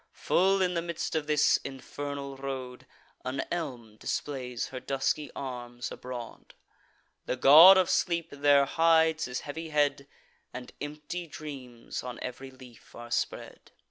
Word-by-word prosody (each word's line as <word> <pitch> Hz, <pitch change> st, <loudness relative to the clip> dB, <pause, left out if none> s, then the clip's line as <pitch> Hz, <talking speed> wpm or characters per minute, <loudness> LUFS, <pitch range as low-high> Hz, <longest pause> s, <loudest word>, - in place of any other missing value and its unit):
Full 190 Hz, +1 st, +2 dB
in 180 Hz, -1 st, 0 dB
the 170 Hz, -, 0 dB
midst 170 Hz, -1 st, -4 dB
of 155 Hz, -2 st, -1 dB
this 150 Hz, -1 st, +4 dB
infernal 140 Hz, +1 st, -6 dB
road, 130 Hz, -2 st, -6 dB, 0.4 s
An 130 Hz, +1 st, -2 dB
elm 125 Hz, -11 st, -5 dB
displays 125 Hz, -1 st, -4 dB
her 130 Hz, -, -6 dB
dusky 135 Hz, +3 st, -1 dB
arms 120 Hz, -2 st, -6 dB
abroad: 125 Hz, -2 st, -8 dB, 0.7 s
The -, -, 0 dB
God 155 Hz, +9 st, +9 dB
of 185 Hz, -2 st, +3 dB
Sleep 170 Hz, -2 st, 0 dB
there 145 Hz, 0 st, +4 dB
hides 160 Hz, +1 st, +3 dB
his 125 Hz, 0 st, -4 dB
heavy 160 Hz, +3 st, -6 dB
head, 145 Hz, -2 st, +1 dB, 0.5 s
And 125 Hz, -1 st, -7 dB
empty 150 Hz, +4 st, -6 dB
dreams 135 Hz, -7 st, -8 dB
on 125 Hz, -1 st, -7 dB
ev'ry 130 Hz, +1 st, -6 dB
leaf 130 Hz, -3 st, -16 dB
are 120 Hz, 0 st, -10 dB
spread. -, -, -4 dB
140 Hz, 140 wpm, -29 LUFS, 125-160 Hz, 0.7 s, God